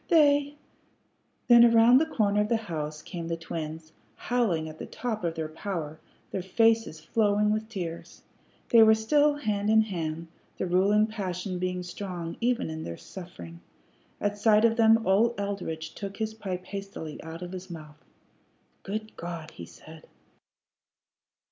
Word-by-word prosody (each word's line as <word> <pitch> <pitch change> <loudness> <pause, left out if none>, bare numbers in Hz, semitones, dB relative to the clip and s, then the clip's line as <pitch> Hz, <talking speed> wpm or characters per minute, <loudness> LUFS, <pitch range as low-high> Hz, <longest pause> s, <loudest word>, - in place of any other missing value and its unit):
They 290 -3 +4 0.4
" - - -44
Then 240 -1 +8
around 235 +2 +7
the 320 - +1
corner 210 -7 +1
of 210 - -1
the 230 - +3
house 155 -7 -5
came 170 -2 -6
the 165 0 -2
twins, 160 -1 -6 0.2
howling 210 -11 0
at 155 0 -10
the - - -6
top 225 -5 -4
of 165 -1 -1
their 160 -1 -3
power, 160 -2 -5 0.3
their 190 - -2
faces 225 -2 +2
flowing 210 +4 +1
with 215 +1 -3
tears. 175 -6 -6 0.5
They 230 - +7
were 220 0 +7
still 290 +7 +3
hand 210 -7 -1
in 220 0 +5
hand, 165 -5 -4 0.3
the - - -2
ruling 195 +4 +3
passion 185 -4 -4
being 180 0 -2
strong 175 -2 -6
even 240 -8 0
in 160 0 -5
this 85 - -7
suffering. 85 - -10 0.6
At 205 0 -2
sight 215 +1 +5
of 225 -1 +3
them 225 -1 +4
old 215 +4 +3
Eldridge 170 -6 -4
took 200 -1 -7
his 220 0 -2
pipe 185 -4 -5
hastily 195 -6 -7
out 165 +2 -7
of 175 - -7
his 185 0 -8
mouth. 155 -2 -10 0.8
"Good 215 +2 -5
God!" 170 -2 -7
he 85 - -10
said. 160 - -14
195 Hz, 160 wpm, -27 LUFS, 165-220 Hz, 0.8 s, Then